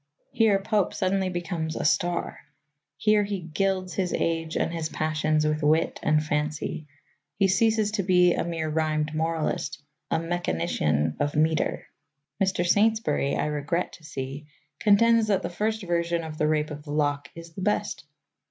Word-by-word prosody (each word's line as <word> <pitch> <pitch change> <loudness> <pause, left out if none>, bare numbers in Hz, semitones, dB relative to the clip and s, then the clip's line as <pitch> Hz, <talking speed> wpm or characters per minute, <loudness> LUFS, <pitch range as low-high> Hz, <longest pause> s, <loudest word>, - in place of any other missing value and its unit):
Here 225 -5 +4
Pope 200 0 0
suddenly 190 0 0
becomes 170 -3 -3
a - - -3
star. 175 +3 0 0.6
Here 215 -1 +3
he 200 -1 -3
gilds 185 +2 -1
his 185 -2 -1
age 165 -1 -1
and 165 - 0
his 160 -2 -3
passions 155 -1 0
with 155 0 0
wit 155 +2 +2
and 155 0 +2
fancy; 150 0 -2 0.5
he 195 -1 +4
ceases 215 +2 +2
to 210 -2 0
be 180 -2 +4
a - - -1
mere 165 -2 -3
rhymed 155 -1 0
moralist, 160 -2 -1 0.3
a - - +1
mechanician 80 - -1
of 145 0 -1
metre. 155 +1 +1 0.6
Mr. 190 -2 0
Saintsbury, 205 -8 +2
I - - 0
regret 150 +4 -2
to 165 - -14
see, 140 -1 -6 0.3
contends 225 +2 +4
that 200 -3 +1
the - - -3
first 220 +4 -1
version 170 -1 0
of 155 -1 -7
The 150 - +2
Rape 150 0 0
of 150 0 -6
the 145 0 -9
Lock 145 -1 0
is 165 0 -10
the 190 - -7
best. 210 +2 -1
165 Hz, 160 wpm, -26 LUFS, 155-190 Hz, 0.6 s, Here